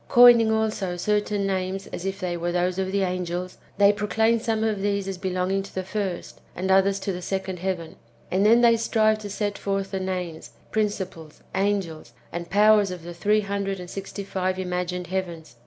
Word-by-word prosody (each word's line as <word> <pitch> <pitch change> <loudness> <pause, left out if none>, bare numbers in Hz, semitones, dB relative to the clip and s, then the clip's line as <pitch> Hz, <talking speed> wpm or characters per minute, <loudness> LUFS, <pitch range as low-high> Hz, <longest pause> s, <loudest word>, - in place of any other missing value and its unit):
Coining 240 -3 +7
also 215 -5 -1
certain 210 +1 0
names 190 0 -2
as 185 - -4
if 195 0 -3
they 180 -1 -2
were 175 +1 -2
those 180 +1 0
of 190 0 -1
the 200 0 +1
angels, 180 0 -3 0.2
they 200 +1 +6
proclaim 220 +3 +1
some 220 -1 -1
of 215 -3 0
these 200 -1 0
as 190 -2 -4
belonging 185 +1 0
to 195 - -11
the 190 - -2
first, 190 -2 -4
and 190 +2 -1
others 195 +1 +4
to 195 - -2
the 180 - -5
second 190 -1 -3
heaven; 175 -3 -3 0.3
and 190 +2 +2
then 230 +3 +6
they 230 -1 +6
strive 220 -1 +2
to 210 -1 -7
set 205 0 -2
forth 195 -1 -2
the 190 - -2
names, 180 -4 -4 0.2
principles, 190 -7 -3
angels, 190 -10 -1 0.2
and 170 0 -5
powers 210 0 +5
of 180 -2 -7
the 175 +1 -7
three 210 +5 +2
hundred 200 -1 -2
and 180 0 -8
sixty 195 +1 -6
five 185 -1 -1
imaf^ined 180 -1 -3
heavens. 175 -6 -4
195 Hz, 190 wpm, -25 LUFS, 180-205 Hz, 0.3 s, Coining